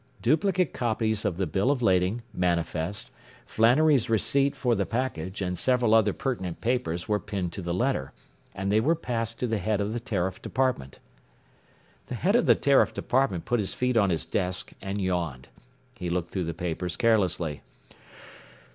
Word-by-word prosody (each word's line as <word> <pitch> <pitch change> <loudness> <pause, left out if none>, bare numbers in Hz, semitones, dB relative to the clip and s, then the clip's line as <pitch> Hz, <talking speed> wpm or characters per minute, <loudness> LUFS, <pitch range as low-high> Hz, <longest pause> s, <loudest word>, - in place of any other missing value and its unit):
Duplicate 180 - +2
copies 110 -2 -1
of 95 -5 -1
the 95 - 0
bill 95 - 0
of 135 -4 +1
lading, 95 +4 +2
manifest, 85 +1 -1 0.3
Flannery's 130 +3 +3
receipt 140 +5 +2
for 125 -3 +1
the 100 -3 +1
package 100 -6 -3
and 90 -1 -3
several 125 -3 +2
other 110 -2 +5
pertinent 95 -9 -3
papers 115 -9 -1
were 105 -1 +1
pinned 100 -5 -4
to - - -5
the 85 -1 -3
letter, 95 - 0 0.4
and 95 +1 -2
they 105 - +4
were 155 +9 +2
passed 115 -7 -3
to - - 0
the 110 -3 -1
head 105 +2 0
of 105 +1 -1
the 120 - -2
Tariff 95 -6 -2
Department. 125 - -1 1.1
The 125 - -4
head 190 - +1
of 240 - +3
the - - +7
Tariff 140 -1 +3
Department 125 -10 0
put 120 - +1
his 100 - -3
feet 125 0 0
on 100 -4 +4
his 80 -4 -1
desk 90 -1 -2
and 100 +1 -3
yawned. 85 -9 -2 0.4
He 90 -1 -5
looked 85 0 -2
through 95 -3 -2
the 85 0 -4
papers 90 0 -3
carelessly. 90 -9 +1
105 Hz, 175 wpm, -27 LUFS, 90-125 Hz, 1.1 s, the